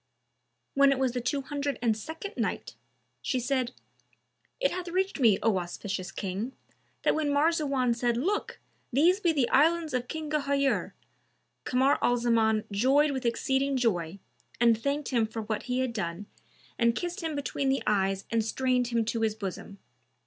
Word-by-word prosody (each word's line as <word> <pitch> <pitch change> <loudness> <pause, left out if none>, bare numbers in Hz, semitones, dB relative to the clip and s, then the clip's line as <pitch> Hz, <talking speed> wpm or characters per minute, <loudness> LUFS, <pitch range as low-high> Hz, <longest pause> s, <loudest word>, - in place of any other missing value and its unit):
When 275 0 +5
it 275 - +1
was 260 -1 +1
the 245 0 -3
Two 275 +3 -1
Hundred 285 0 -3
and 230 -3 +2
Second 320 - -7
Night, - - -3 0.5
She 260 - -1
said, 255 0 0 0.9
It - - +2
hath 365 0 -4
reached 375 0 -1
me, 225 -7 +5
O 210 -4 +3
auspicious 185 +2 -5
King, 200 +6 -4 0.5
that - - +3
when 310 -2 0
Marzawan 285 -4 +2
said 235 0 0
"Look! 390 +11 -1 0.3
these 335 +9 +4
be 345 -5 +2
the 275 -6 +1
Islands 320 +2 +3
of 250 -1 -1
King 310 +2 -5
Ghayur;" 280 -2 +1 0.7
Kamar 260 +2 +3
al 245 - +3
Zaman 225 -2 +2
joyed 270 +8 +3
with 260 -3 -2
exceeding 265 +3 0
joy 190 -8 0 0.4
and 235 -1 +5
thanked 280 +6 -2
him 235 -4 +2
for 225 0 -5
what 215 0 -3
he 250 +1 +1
had 255 -2 -1
done 175 -2 -4 0.5
and 235 -1 +3
kissed 350 +5 -3
him 320 -2 -3
between 280 -1 -1
the 270 - +1
eyes 195 -2 +1
and 230 -1 +2
strained 250 +2 0
him 235 -2 0
to 225 +1 -2
his 220 -1 +1
bosom. 195 -1 -6
255 Hz, 170 wpm, -28 LUFS, 225-285 Hz, 0.9 s, When